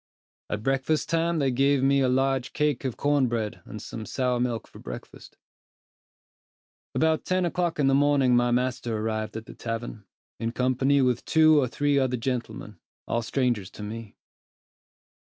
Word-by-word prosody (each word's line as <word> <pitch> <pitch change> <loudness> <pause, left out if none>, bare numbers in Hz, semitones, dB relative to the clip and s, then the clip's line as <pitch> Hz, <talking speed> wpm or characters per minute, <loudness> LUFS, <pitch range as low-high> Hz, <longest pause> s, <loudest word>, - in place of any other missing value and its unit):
At 105 +1 -3
breakfast 135 +4 0
time 165 0 +1
they 135 -3 +1
gave 135 +1 +2
me 140 0 +4
a 130 - +2
large 135 0 +1
cake 150 -4 0
of 130 - -3
corn 145 -2 +2
bread 115 -3 -3
and 110 - -8
some 110 +1 -7
sour 125 -2 0
milk 120 -2 -2
for - - -14
breakfast. - - -10 1.6
About 160 0 +2
ten 185 0 +1
o'clock 175 -1 -1
in 145 - +2
the 135 - +4
morning 140 -3 +4
my 120 0 +3
master 125 -2 0
arrived 110 0 -3
at 110 - -7
the - - -11
tavern, 115 -2 -5 0.3
in 115 0 -2
company 130 +2 +2
with 125 -2 +1
two 155 -2 +5
or 130 - +1
three 145 +3 +1
other 130 -2 0
gentlemen, 115 -5 -4 0.3
all 115 - 0
strangers 120 -5 -1
to 105 - -10
me. 110 0 -7
130 Hz, 165 wpm, -26 LUFS, 115-140 Hz, 1.6 s, two